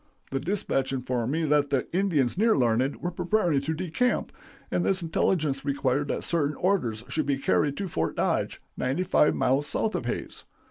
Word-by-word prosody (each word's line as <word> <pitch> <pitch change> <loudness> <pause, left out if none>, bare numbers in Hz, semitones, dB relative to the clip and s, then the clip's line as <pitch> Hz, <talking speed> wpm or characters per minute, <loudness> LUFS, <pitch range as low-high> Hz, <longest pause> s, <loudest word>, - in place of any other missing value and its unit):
The 135 - 0
dispatch 145 -5 -1
informed 125 -2 -1
me 160 +2 0
that 145 -1 +2
the 135 -3 0
Indians 170 -10 +2
near 220 +4 +3
Larned 125 +2 +2
were 175 - -1
preparing 175 -4 +1
to 160 +3 -2
decamp, 185 +9 0 0.4
and 175 - +1
this 190 -2 +1
intelligence 155 -4 0
required 140 0 0
that - - -2
certain 150 -3 0
orders 125 - 0
should 155 -3 -2
be 140 -1 +1
carried 140 +1 +1
to 200 - -2
Fort 80 - -2
Dodge, - - 0 0.2
ninety 135 +8 -1
five 175 -4 +3
miles 135 +3 +1
south 220 - 0
of - - -3
Hays. - - -4
145 Hz, 180 wpm, -27 LUFS, 135-180 Hz, 0.4 s, near